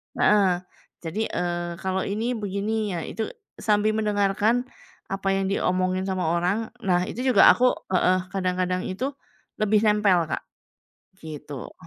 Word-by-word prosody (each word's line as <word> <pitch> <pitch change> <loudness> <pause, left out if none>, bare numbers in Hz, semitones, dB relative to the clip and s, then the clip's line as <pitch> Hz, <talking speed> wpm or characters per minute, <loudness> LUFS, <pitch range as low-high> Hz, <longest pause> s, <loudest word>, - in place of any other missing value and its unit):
Heeh. 190 -4 +3 0.4
Jadi, 205 +7 -2
eee, 175 -1 -2
kalau 190 0 -1
ini 220 +5 -1
begini 205 0 -2
ya 170 - -2
itu, 220 0 -4 0.3
sambil 210 0 +2
mendengarkan 210 +2 +1 0.5
apa 195 0 -3
yang 195 0 0
diomongin 185 0 0
sama 185 -1 -1
orang. 180 +6 0
Nah, 180 -4 +1
itu 210 - -6
juga 255 - +8
aku 250 +1 +3 0.2
heeh, 185 0 +3
kadang-kadang 185 -1 -1
itu 255 +10 -3 0.5
lebih 215 0 +3
nempel 210 -5 +4
Kak. - - -2 0.8
Gitu. 150 -4 -8
195 Hz, 130 wpm, -25 LUFS, 180-215 Hz, 0.8 s, juga